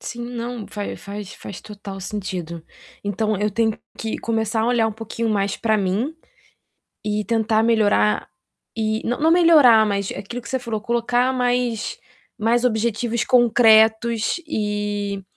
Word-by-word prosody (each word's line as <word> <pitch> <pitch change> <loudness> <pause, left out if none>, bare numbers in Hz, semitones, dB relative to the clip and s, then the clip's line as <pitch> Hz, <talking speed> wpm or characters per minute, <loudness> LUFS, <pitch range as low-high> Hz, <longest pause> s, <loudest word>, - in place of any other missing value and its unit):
Sim, 240 - -6
não, 235 -2 -5
faz 205 -1 -6
faz 200 -1 -8
faz 200 - -9
total 200 -2 -9
sentido. 180 -4 -5 0.4
Então, 210 +1 -1
eu 210 +2 0
tenho 220 +1 0 0.2
que 225 - -4
começar 225 -1 -1
a - - 0
olhar 235 -2 +2
um - - -5
pouquinho 225 +1 -4
mais 200 -1 0
para 220 -1 +1
mim, 205 +10 -1 0.9
e 210 0 -1
tentar 220 -1 +1
melhorar 215 -2 +2 0.5
e 220 0 -1
não 245 - -1
não 320 +2 +3
melhorar, 305 -10 +6
mas 200 -2 -1
aquilo 235 +5 -6
que 230 - -11
você 260 - -1
falou, 230 -3 -4
colocar 240 +3 +1
mais 245 - -1 0.4
mais 235 +3 +1
objetivos 235 0 0
concretos 225 -2 +4
e 205 -4 -2
220 Hz, 145 wpm, -21 LUFS, 205-235 Hz, 0.9 s, melhorar